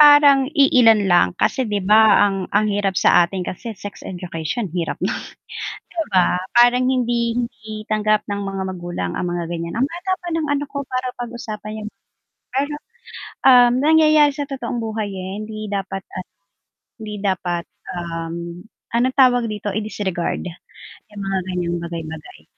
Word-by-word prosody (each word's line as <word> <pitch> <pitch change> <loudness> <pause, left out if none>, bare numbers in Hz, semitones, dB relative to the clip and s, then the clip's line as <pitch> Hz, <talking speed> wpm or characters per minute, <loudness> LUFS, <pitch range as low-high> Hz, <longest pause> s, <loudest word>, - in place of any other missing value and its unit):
Parang 290 -2 +7
iilan 230 -7 +6
lang, 175 - +5
kasi 260 - +1
'di 205 -1 0
ba, 215 +1 +6 0.2
ang 205 +1 +2
hirap 200 -2 0
sa - - +5
atin 180 +1 -5
kasi 225 +7 -5
sex 205 +1 -9
education, 180 +3 -4
hirap 175 -2 -2
non - - 0 0.6
'di 335 -2 -5
ba? 180 -2 +3 0.2
Parang 245 +1 +5
hindi 240 -2 +1 0.5
tanggap 215 0 +1
ng 205 0 -3
mga 195 -1 -4
magulang 175 - -4
ang - - -2
mga 175 -1 -3
ganyan, 170 0 -4
ang 265 - +3
bata 350 +4 -5
pa 355 - -10 0.6
para 255 -1 -3
pag-usapan. 215 -3 -6
'yung 210 - -5 0.6
Pero 280 +3 -1 1.1
nangyayari 305 -1 +5
sa 290 0 -4
totoong 245 -4 -4
buhay 220 -2 -3
eh, 190 -1 -6
hindi 215 0 -6
dapat 195 -1 -3
ah, 185 - -5 0.7
hindi 215 -2 -7
dapat, 180 -3 -1 0.2
ahm, 170 +1 -6 0.2
ano 235 +2 +2
tawag 245 -3 +4
dito 210 -1 -4
i-disregard 200 -4 -2 0.7
'yung 205 -1 -8
mga 195 0 -1
ganyang 175 -1 -1
bagay-bagay. 165 -2 -7
210 Hz, 140 wpm, -20 LUFS, 180-245 Hz, 1.1 s, Parang